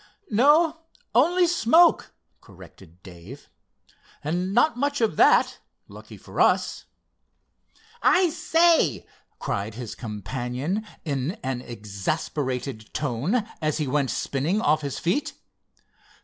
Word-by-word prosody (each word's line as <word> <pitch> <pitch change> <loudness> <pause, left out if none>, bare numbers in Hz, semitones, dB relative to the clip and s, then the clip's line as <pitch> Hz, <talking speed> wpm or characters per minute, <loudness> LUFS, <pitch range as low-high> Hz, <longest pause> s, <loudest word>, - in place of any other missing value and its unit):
"No, 305 +8 +4 0.3
only 345 +10 +4
smoke," 335 0 +4 0.3
corrected 90 -1 -16
Dave—"and 140 - -8
not 240 +5 +3
much 285 +3 -1
of 225 -2 +1
that, - - +4 0.3
lucky - - -12
for - - -4
us!" - - +1 1.2
"I 360 -2 +4
say!" 330 - +2 0.3
cried 100 +2 -4
his 115 -2 -6
companion 125 - -4 0.2
in 140 +1 -2
an 130 -2 -3
exasperated 125 - -4
tone 150 - -1 0.2
as 155 -1 0
he 155 - -1
went 140 0 0
spinning 150 +9 -1
off 155 -4 +2
his 140 -2 -4
feet. 250 - -1
155 Hz, 105 wpm, -24 LUFS, -, 1.2 s, No